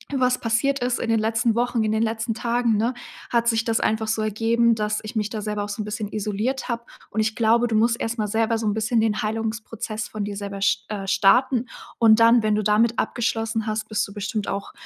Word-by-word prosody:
was 255 -1 +2
passiert 255 +5 +1
ist 245 0 -1
in 230 - -2
den 225 -1 +3
letzten 225 +1 +1
Wochen, 240 0 0
in 215 - 0
den 220 0 +1
letzten 225 0 -1
Tagen, 235 -1 0
ne, 230 +4 0 0.4
hat 235 0 +2
sich 225 0 +1
das 225 -1 +1
einfach 220 0 0
so 220 0 0
ergeben, 230 +2 +2
dass 210 -1 -1
ich 215 +1 -6
mich 210 0 0
da 215 - -4
selber 210 -1 -3
auch - - -9
so 205 +1 -4
'n - - -4
bisschen 210 0 -4
isoliert 215 +6 -2
habe.“ 235 -1 -2 0.3
Und, - - -3
ich 220 +1 0
glaube, 235 +1 +3
du 225 - -1
musst 230 +2 +2
erst 230 +1 -3
mal 215 - -1
selber 225 +2 +1
so 220 -1 -2
'n 205 - +1
bisschen 220 +1 +1
den 215 -1 0
Heilungsprozess 220 0 -4
von 215 -1 -5
dir 200 -1 -5
selber 200 -1 -6
sch 200 - +1
äh, 200 -2 -5
starten. 235 +6 +3 0.3
Und 225 -1 +6
dann, 230 +1 +6
wenn 215 -1 +2
du 215 - 0
damit 220 +3 +2
abgeschlossen 225 -1 -1
hast, 215 0 -3
bist 215 - 0
du 200 - -12
bestimmt 205 0 -3
auch, 200 0 -4
220 Hz, 240 wpm, -23 LUFS, 215-230 Hz, 0.4 s, Und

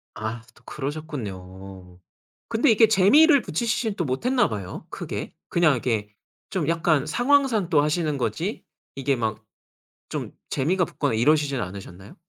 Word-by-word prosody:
아 110 +2 -4
또 - - -23
그러셨군요. 95 - -7 0.5
근데 230 +4 +3
이게 225 +1 +6
재미를 270 - +6
붙이시지는 220 +4 -1
또 175 - -2
못했나 245 - +1
봐요 100 -5 -6
크게. - - -6 0.2
그냥 170 -4 +4
이렇게 115 -5 -1 0.4
좀 175 -7 -2
약간 160 -3 +2
상황상 245 - +2
또 150 -4 +4
하시는 150 -1 0
거지 135 - -3 0.3
이게 135 0 0
막 110 -2 -3 0.7
좀 - - -4 0.2
재미가 180 +7 +1
붙거나 145 -6 -2
이러시지는 140 +3 +2
않으셨나요? 95 0 -10
150 Hz, 315 characters per minute, -24 LUFS, -, 0.7 s, 이게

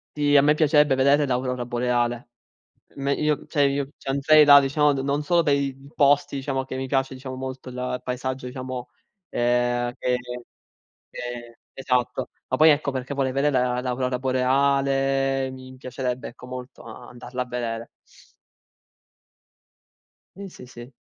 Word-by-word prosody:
Sì, 145 -1 +2
a 140 - +8
me 150 +2 +4
piacerebbe 150 -2 +4
vedere 140 +2 +3
l'aurora 125 -1 -1
boreale. 120 0 -1 0.7
Me 140 0 -1
io 150 -1 -1
cioè 145 - 0
io 140 0 +1
c'andrei 140 +3 +4
là, 145 -1 +9
diciamo 145 +2 +2
d 140 - -3
non 140 +2 -1
solo 170 +3 +2
per 145 -2 +3
i 140 -1 -1 0.2
posti, 145 0 +3
diciamo 135 -1 -2
che 130 0 -6
mi 130 - -3
piace, 135 0 0
diciamo 130 0 -7
molto 130 0 -7
il 125 0 -4
paesaggio, 130 +1 -4
diciamo, 130 -1 -6 0.4
ehm, 120 0 +1
che 125 0 0 0.9
che 120 -1 -7 0.2
esatto. 125 -2 -1 0.2
Ma - - 0
poi 155 +1 +7
ecco 145 -1 +1
perché 130 0 -5
vorrei 135 -2 0
vedere 130 -3 +1
l'aurora 125 0 -1
boreale, 135 +1 +1
mi 130 0 -11
piacerebbe 125 -1 -4
ecco 120 - -13
molto 125 0 -9
andarla 120 +2 -7
a - - -7
vedere. 115 -2 -4 2.5
Sì, 200 0 -7
sì, 170 - -13
sì. 120 +1 -12
130 Hz, 145 wpm, -24 LUFS, 125-140 Hz, 2.5 s, là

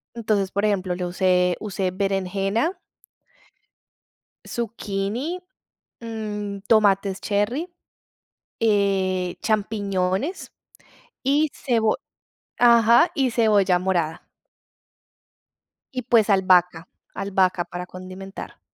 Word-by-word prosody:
Entonces, 210 -4 0
por 200 +2 -1
ejemplo, 190 -4 0
le 180 - -3
usé 180 0 +2
usé 195 -3 -2
berenjena 195 - -1 1.7
zucchini, 230 - -3 0.6
mm, 210 -3 -5
tomates 200 -3 +3
cherry, 215 - -1 0.9
eh, 195 -4 +1
champiñones 205 - -1 0.7
y 290 +3 +2
cebo 225 -4 +1 0.6
ajá, 235 +5 +6
y 265 -3 +1
cebolla 205 -6 +3
morada. 175 -3 -1 1.7
Y, 255 - -3
pues, 225 -3 +3
albahaca. 180 -3 +3 0.3
Albahaca 190 -2 +1
para 180 +1 -7
condimentar. 185 +1 -9
200 Hz, 80 wpm, -23 LUFS, 185-225 Hz, 1.7 s, ajá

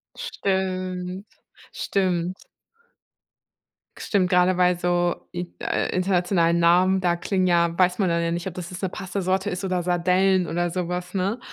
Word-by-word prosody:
Stimmt. 185 0 -3 0.5
Stimmt. 185 -2 -1 1.6
Stimmt, 190 -3 +1
gerade 180 0 +3
weil 180 -1 +3
so 175 0 0
in 175 0 -6
äh, - - -1
internationalen 180 -2 +2
Namen, 180 +3 +4
da 175 -2 +1
klingen 185 +2 -1
ja 170 -1 +2
weiß 180 0 +2
man 190 -3 +2
dann 170 0 +1
ja 170 - -1
nicht, 170 +2 -3
ob 185 - -6
das 180 0 -6
jetzt 185 - -7
'ne 190 - -1
Pasta-Sorte 190 +1 -2
ist 180 - -4
oder 185 -2 -1
Sardellen 180 +1 +2
oder 175 +1 -1
so 180 0 -2
was, 180 0 -4
ne? 195 +5 -1
180 Hz, 155 wpm, -24 LUFS, 175-185 Hz, 1.6 s, Namen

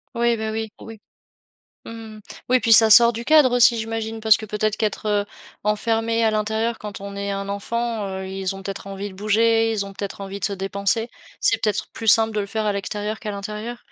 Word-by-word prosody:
Oui, 235 0 +2
bah, 220 0 -3
oui, 220 0 -4
oui. 225 -2 -10 0.9
Mmh. 225 -1 -9 0.3
Oui 255 - +4
puis 225 -1 +4
ça 220 0 +8
sort 235 +2 +8
du 230 +1 -5
cadre 280 -3 +5
aussi 235 -1 +5
j'imagine? 225 0 -4
Parce 220 -1 +5
que 220 - -8
peut-être 210 0 -1
qu'être, 215 0 -2
heu, 205 -1 +1 0.4
enfermé 225 +2 0
à 220 - +3
l'intérieur 220 +2 -1
quand 210 -2 -7
on 200 0 -8
est 200 0 -3
un 195 0 -4
enfant, 225 +2 -3
heu, 190 0 -5
ils 190 0 -3
ont 195 - -10
peut-être 195 0 -6
envie 195 +1 -6
de - - -13
bouger, 225 +3 +2
ils 205 -3 -2
ont 195 - -10
peut-être 200 0 -6
envie 195 0 -6
de - - +1
se - - -2
dépenser, 200 +4 -1 0.3
c'est 410 - +2
peut-être 210 -2 -1
plus 225 - -6
simple 220 +1 +5
de - - +1
le - - -4
faire 215 +2 -3
à 210 - +1
l'extérieur 210 +2 -4
qu'à 215 -4 -5
l'intérieur? 210 +4 -6
215 Hz, 220 wpm, -22 LUFS, 200-225 Hz, 0.9 s, ça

